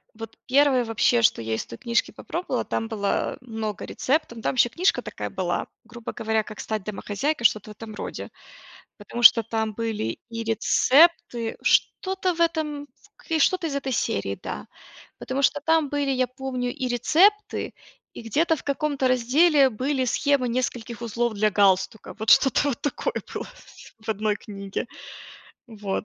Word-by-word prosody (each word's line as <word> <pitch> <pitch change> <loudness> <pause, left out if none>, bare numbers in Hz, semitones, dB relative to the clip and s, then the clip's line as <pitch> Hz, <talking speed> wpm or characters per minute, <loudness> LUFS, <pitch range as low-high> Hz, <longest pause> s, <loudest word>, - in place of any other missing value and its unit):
Вот 225 0 -9
1, 270 -1 +4
вообще, 225 +1 +2
что 215 - +3
я 110 0 -3
из - - -4
той 115 - -10
книжки 235 0 0
попробовала, 350 +2 -4
там 225 - -2
было 205 -3 -1
много 220 -4 -5
рецептов, 265 -5 -1
там - - -1
еще 240 -1 +4
книжка 360 +11 +1
такая - - -6
была, - - -2 0.2
грубо 235 0 -8
говоря, 220 0 0
как 210 0 -11
стать 215 -2 -3
домохозяйкой, 215 +6 -3
что-то 215 0 +2
в - - -12
этом 220 0 -9
роде, - - -6 0.7
потому 235 +3 -6
что 230 +1 +9
там 220 -1 -2
были 220 - -3
и 230 0 -4
рецепты, 245 +2 +3
что-то 380 -1 +1
в 335 - -3
этом 305 -4 -1
в - - -24
к 325 -1 -3
что-то 355 +2 +2
из 280 - -4
этой 270 -2 -2
серии, 100 - -1
да. - - -6 0.5
Потому 265 +2 -3
что 290 +2 +2
там 320 -1 +2
были, 285 -1 0
я 255 -1 +1
помню, 255 -1 -4
и 255 - -3
рецепты, 355 - +2 0.4
и - - -8
где-то, 315 +9 +1
в - - -11
каком-то 280 -2 0
разделе, 270 +4 +4
были 260 +4 -1
схемы 265 0 +1
нескольких 235 -1 -3
узлов 235 0 -1
для 215 +1 +2
галстука. 195 +2 +1
Вот 220 0 -1
что-то 275 +2 +5
вот 260 - -4
такое 290 - -2 0.2
было - - -5 0.5
в 220 +1 -9
одной 210 0 0
книге. 200 +1 -6 0.8
Вот. 210 -3 -4
240 Hz, 165 wpm, -24 LUFS, 220-285 Hz, 0.8 s, что